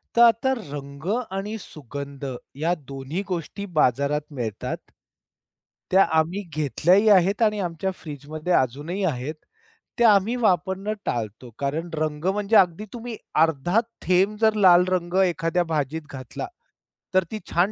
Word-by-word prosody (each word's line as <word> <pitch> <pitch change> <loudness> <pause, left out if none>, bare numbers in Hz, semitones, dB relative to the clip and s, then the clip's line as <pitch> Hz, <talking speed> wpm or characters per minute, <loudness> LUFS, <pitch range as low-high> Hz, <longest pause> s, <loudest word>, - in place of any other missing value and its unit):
तर 235 - +5
आता 235 +3 +4
रंग 140 -5 -8 0.3
आणि 210 +3 -3
सुगंध 140 -2 -8 0.3
या 160 +5 +1
दोन्ही 135 +7 -4
गोष्टी 185 +2 -4
बाजारात 140 +3 +2
मिळतात. 115 -6 -3 1.1
त्या 190 +1 +7
आम्ही 170 +6 +1
घेतल्याही 175 - +3
आहेत 195 +2 +4
आणि 210 -1 +2
आमच्या 175 +2 -2
फ्रिजमध्ये 155 +3 -5
अजूनही 145 +10 0
आहेत. 145 -2 -2 0.6
त्या 235 -2 +6
आम्ही 205 +5 +2
वापरणं 190 -1 +1
टाळतो 115 +1 -3
कारण 150 +5 -2
रंग 155 0 -2
म्हणजे 205 +3 +1
अगदी 185 +2 +3
तुम्ही 240 -1 -6 0.3
अर्धा 165 +6 +2 0.2
थेंब 190 +4 +2
जर 220 -1 +5
लाल 180 -3 +6
रंग 175 -1 -1
एखाद्या 175 0 +1
भाजीत 160 -1 -2
घातला 130 - -6 0.7
तर 185 -1 +4
ती 215 - -4
छान 180 +5 +3
175 Hz, 130 wpm, -24 LUFS, 145-195 Hz, 1.1 s, त्या